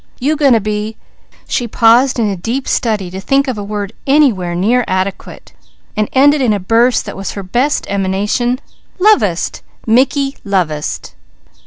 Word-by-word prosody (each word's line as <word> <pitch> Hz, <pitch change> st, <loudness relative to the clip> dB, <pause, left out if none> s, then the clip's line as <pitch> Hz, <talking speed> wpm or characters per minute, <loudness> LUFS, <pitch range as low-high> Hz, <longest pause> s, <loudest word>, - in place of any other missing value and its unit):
You 290 Hz, +5 st, +1 dB
going 285 Hz, -4 st, +4 dB
to 225 Hz, -, +4 dB
be" 210 Hz, +1 st, -3 dB, 0.5 s
she 245 Hz, -, -1 dB
paused 235 Hz, +4 st, +4 dB
in 225 Hz, -3 st, +1 dB
a 200 Hz, -, -1 dB
deep 230 Hz, +9 st, -3 dB
study 210 Hz, -6 st, -1 dB
to 190 Hz, +1 st, -6 dB
think 275 Hz, +6 st, +1 dB
of 260 Hz, -, -1 dB
a -, -, -4 dB
word 205 Hz, 0 st, -5 dB
anywhere 240 Hz, -, +2 dB
nearly 230 Hz, +7 st, +1 dB
adequate, 185 Hz, +1 st, -4 dB, 0.4 s
then 215 Hz, -1 st, 0 dB
ended 285 Hz, +2 st, +4 dB
in 235 Hz, -5 st, +2 dB
a 205 Hz, -, -1 dB
burst 230 Hz, +6 st, +2 dB
that -, -, -7 dB
was 195 Hz, -1 st, -5 dB
her 200 Hz, -, -6 dB
best 245 Hz, +10 st, 0 dB
emanation 200 Hz, +6 st, -1 dB, 0.4 s
"lovest! 250 Hz, -, +2 dB, 0.2 s
Mickey 270 Hz, +4 st, +2 dB
lovest!" 165 Hz, -, -2 dB
225 Hz, 160 wpm, -15 LUFS, 195-260 Hz, 0.5 s, going